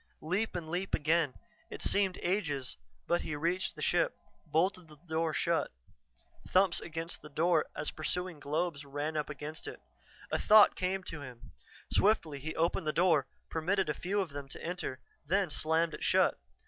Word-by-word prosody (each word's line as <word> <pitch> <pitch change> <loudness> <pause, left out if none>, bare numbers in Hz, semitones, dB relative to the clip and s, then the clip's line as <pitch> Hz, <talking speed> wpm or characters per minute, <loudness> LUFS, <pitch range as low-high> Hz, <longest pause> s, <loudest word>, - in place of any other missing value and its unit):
Leap 190 +8 0
and 170 -3 -3
leap 180 +4 -1
again. 155 -2 +2 0.3
It - - -6
seemed 195 -2 +2
ages, 155 -8 -1 0.3
but 175 - +2
he 150 - -3
reached 175 +5 -1
the - - -5
ship, - - +2 0.3
bolted 175 +3 +1
the 155 - -14
door 160 +1 -1
shut. 170 +1 0 0.8
Thumps 185 -1 +4
against 165 +1 -4
the 150 - -11
door 160 +2 +2
as 150 0 -1
the - - -10
pursuing 180 +1 -2
globes 150 +1 -1
ran 145 +3 -3
up 150 -1 -1
against 150 +2 -6
it. - - -7 0.5
A - - +1
thought 215 -1 +7
came 185 +1 -1
to 160 -4 -7
him; 125 -2 -10 0.4
swiftly 165 -9 +3
he 155 +3 -5
opened 165 -1 +1
the - - +3
door, 165 -6 +3 0.2
permitted 180 +2 +1
a - - +2
few 195 +6 -1
of 185 - -3
them 140 -1 -7
to - - -8
enter, 170 -6 -3 0.3
then 190 0 +2
slammed 160 +2 +1
it - - -6
shut. - - +4
165 Hz, 175 wpm, -32 LUFS, 150-180 Hz, 0.8 s, thought